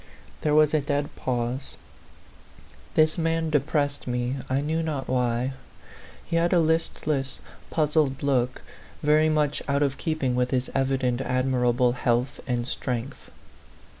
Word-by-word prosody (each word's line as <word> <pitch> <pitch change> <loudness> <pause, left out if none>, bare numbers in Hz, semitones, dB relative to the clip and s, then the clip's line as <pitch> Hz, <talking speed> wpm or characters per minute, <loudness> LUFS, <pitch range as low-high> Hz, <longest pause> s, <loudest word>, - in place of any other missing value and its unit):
There 150 -1 +2
was 155 0 +5
a 155 - +3
dead 145 +1 -2
pause. 125 +1 -3 1.2
This 155 +2 +3
man 165 -1 0
de 150 - +4
pressed 145 -1 -1
me, 125 +2 -1
I 130 +1 +2
knew 155 +3 -1
not 150 -4 -3
why. 125 0 0 0.7
He 165 - -1
had 170 +2 +2
a 175 - +5
listless, 155 -4 0 0.3
puzzled 150 -4 +1
look, 130 -3 0 0.4
very 155 +1 +4
much 150 -2 +1
out 140 +1 +2
of 135 -2 -1
keep 155 -3 -2
ing 130 -1 +2
with 125 0 +1
his 130 -1 -1
evident 130 -2 +1
admirable 125 -1 +2
health 125 +1 0
and 120 -1 -1
strength. 125 +1 -4
135 Hz, 140 wpm, -26 LUFS, 125-155 Hz, 1.2 s, was